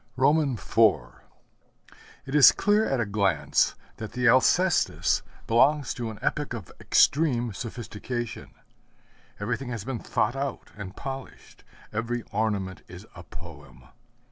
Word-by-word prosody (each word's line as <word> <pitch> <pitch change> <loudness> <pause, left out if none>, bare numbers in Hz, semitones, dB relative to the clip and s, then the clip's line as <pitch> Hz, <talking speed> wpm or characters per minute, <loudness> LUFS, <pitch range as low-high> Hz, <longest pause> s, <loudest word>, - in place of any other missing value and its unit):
IV 140 -2 +1 1.5
It 135 - -7
is 150 -4 +9
clear 210 +1 +2
at 135 - 0
a 120 - +1
glance 100 -6 +1 0.2
that 110 - -7
the 125 0 +1
Alcestis 165 +9 +3 0.2
belongs 135 +4 +3
to 120 -2 -4
an 110 - -8
epoch - - -1
of - - -9
extreme 125 -7 +2
sophistication. 120 +1 -6 0.9
Everything 120 +5 -3
has 115 -5 -4
been 130 -3 -3
thought 120 +4 -1
out 135 0 -4
and 100 -1 -8
polished; 135 -1 -8 0.3
every 115 +2 -2
ornament 100 -4 -2
is - - -11
a - - -10
poem. 60 +1 -12
120 Hz, 120 wpm, -26 LUFS, 105-135 Hz, 1.5 s, is